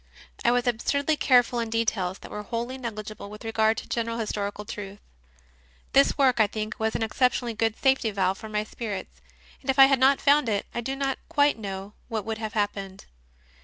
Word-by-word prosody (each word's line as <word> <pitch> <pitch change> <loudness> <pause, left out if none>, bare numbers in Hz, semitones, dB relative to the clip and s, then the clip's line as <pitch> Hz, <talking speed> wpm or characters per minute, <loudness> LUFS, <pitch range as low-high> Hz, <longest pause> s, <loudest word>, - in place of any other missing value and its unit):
I - - +4
was 245 +1 +2
absurdly 280 +6 +1
careful 245 -4 +3
in 230 -1 -2
details 215 -5 0
that - - -12
were 210 - -4
wholly 235 +4 -4
negligible 215 -4 -6
with 210 +2 -10
regard 220 0 +2
to - - -6
general 230 0 -2
historical 210 -2 -3
truth. 200 -1 -7 1.0
This 275 +1 +5
work, 260 -4 +3
I 215 - +5
think, 215 +3 -5
was 220 0 0
an - - 0
exceptionally 245 +1 +1
good 225 0 0
safety 265 -4 +2
valve, 195 -2 0
for 220 - -8
my 210 0 -1
spirits, 205 - -6 0.4
and 265 - -10
if 265 - +2
I 270 - +10
had 270 -1 +3
not 270 +1 +5
found 285 -3 +4
it 205 -2 0
I 240 - -2
do 265 +3 -3
not 270 -1 -1
quite 290 -6 +3
know 195 -1 -6
what 220 -3 -3
would 220 -1 -3
have 220 -2 -4
happened. 200 -2 -3
225 Hz, 200 wpm, -26 LUFS, 210-255 Hz, 1.0 s, I